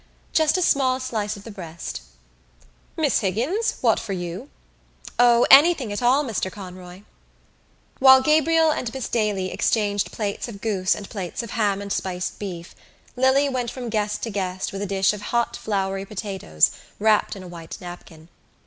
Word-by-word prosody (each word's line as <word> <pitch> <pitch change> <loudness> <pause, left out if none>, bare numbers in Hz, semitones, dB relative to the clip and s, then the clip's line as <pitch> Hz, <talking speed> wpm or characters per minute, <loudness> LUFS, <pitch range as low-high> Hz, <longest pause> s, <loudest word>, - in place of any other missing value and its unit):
"Just 315 +2 +3
a 365 - +1
small 260 -4 +2
slice 215 -5 -3
of 200 - -12
the 225 - -9
breast." 170 - -7 1.0
"Miss - - +2
Higgins, 265 - -1
what - - +3
for 210 -4 -5
you?" 175 -2 -5 0.7
"O, 240 -1 +6
anything 275 -6 +6
at 205 - -3
all, 255 +4 +3
Mr 215 -7 -3
Conroy." 185 -1 -10 1.0
While 265 0 +8
Gabriel 315 +2 +4
and 245 -6 -3
Miss 260 -3 -3
Daly 210 -5 -1
exchanged 205 -2 0
plates 205 0 -3
of 210 -4 -9
goose 195 -4 0
and 200 - -8
plates 190 0 -5
of 230 - -8
ham 200 -3 0
and 200 0 -3
spiced 180 -1 -3
beef 180 -4 -7 0.4
Lily 265 +3 +3
went 255 -3 -2
from 245 -1 -6
guest 210 -1 -1
to 230 - -3
guest 190 -2 -3
with 195 - -5
a 205 - -2
dish 195 0 +2
of 210 - -7
hot 235 +3 -1
floury 195 -2 -2
potatoes 195 - 0 0.3
wrapped 215 0 +2
in 190 - -9
a - - -9
white 170 -2 -9
napkin. 175 -3 -11
210 Hz, 165 wpm, -23 LUFS, 190-250 Hz, 1.0 s, While